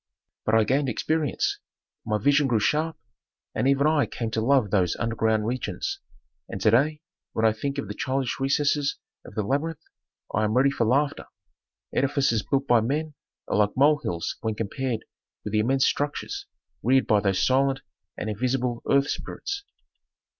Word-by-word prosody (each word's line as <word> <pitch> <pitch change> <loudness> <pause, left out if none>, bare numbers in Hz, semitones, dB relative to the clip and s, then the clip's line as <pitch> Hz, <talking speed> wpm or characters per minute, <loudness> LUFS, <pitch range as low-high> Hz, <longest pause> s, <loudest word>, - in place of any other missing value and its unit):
"But 110 - +4
I 110 - +5
gained 135 +4 +1
experience. 155 +4 0 0.5
My 105 - +1
vision 145 +6 +3
grew 120 -4 +2
sharp 155 +8 0 0.6
and 130 - 0
I - - +5
even 145 +2 +3
came 115 -2 -4
to 110 - 0
love 125 -4 +3
those 90 -5 +2
underground 110 -2 0
regions. 130 - -3 0.5
And - - -5
to 110 - +4
day 150 +6 +2 0.3
when 110 - +1
I 110 - +5
think 140 +5 -3
of 140 - -3
the - - -4
childish 130 -1 -2
recesses 140 +1 +1 0.3
of - - -13
the 110 - 0
labyrinth 150 +8 -2 0.5
I 110 - +1
am 110 +3 +1
ready 135 +2 +4
for 120 -4 0
laughter. 140 +4 +1 0.7
Edifices 135 -4 +2
built 135 +3 0
by 120 -4 +4
men 150 +6 -1 0.3
are - - 0
like 105 +1 +2
mole 145 +2 +5
hills 85 -1 -3
when 110 -1 -1
compared 115 +2 -3 0.4
with 105 - -5
the 110 - +3
immense 130 +5 +2
structures 145 0 -2 0.3
reared 130 +3 +3
by 105 -2 +4
those 100 -2 +1
silent 135 +1 +2 0.4
and - - -4
invisible 120 +2 -1
earth 140 0 +4
spirits. 400 - -4
130 Hz, 170 wpm, -26 LUFS, 110-140 Hz, 0.7 s, I